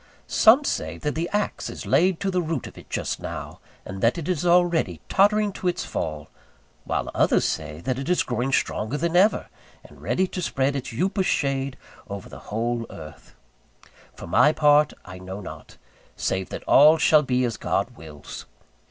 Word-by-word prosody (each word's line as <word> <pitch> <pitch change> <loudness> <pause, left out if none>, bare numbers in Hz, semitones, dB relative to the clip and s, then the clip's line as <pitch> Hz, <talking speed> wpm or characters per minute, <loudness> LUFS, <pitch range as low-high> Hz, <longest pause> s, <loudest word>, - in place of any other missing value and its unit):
Some 240 +7 +5
say - - -2
that 150 - -2
the 165 +2 -2
axe 210 0 -2
is - - -8
laid 180 0 +3
to 195 - 0
the 180 -1 +1
root 160 -5 -3
of - - -10
it - - -14
just - - -3
now, - - -7 0.3
and 95 +1 -7
that 115 +7 +2
it 165 - -5
is 180 -1 -1
already 170 - +2
tottering 205 +1 +3
to 185 - -4
its 180 - -1
fall: 75 -2 -4 0.6
while - - -2
others - - +2
say 75 0 -3
that 130 +6 -2
it 135 - -4
is 180 - +2
growing 125 +2 -2
stronger 115 0 -1
than 170 +2 -1
ever, 200 +5 +4 0.4
and - - -16
ready 190 - +1
to 185 0 -5
spread 140 -4 0
its 130 -2 -4
upas 190 - 0
shade 135 -1 -1 0.3
over 100 -1 -7
the - - -10
whole 115 +2 -2
earth. 80 0 -12 0.8
For - - -9
my 150 - +4
part, 150 -1 +4
I 95 -1 -10
know 95 +2 -7
not, 100 - -10 0.4
save 95 0 -2
that - - -6
all 150 +3 +6
shall 155 -1 +5
be 125 -3 0
as 115 -2 -2
God 105 +4 -2
wills. 75 -5 -10
140 Hz, 185 wpm, -24 LUFS, 110-175 Hz, 0.8 s, all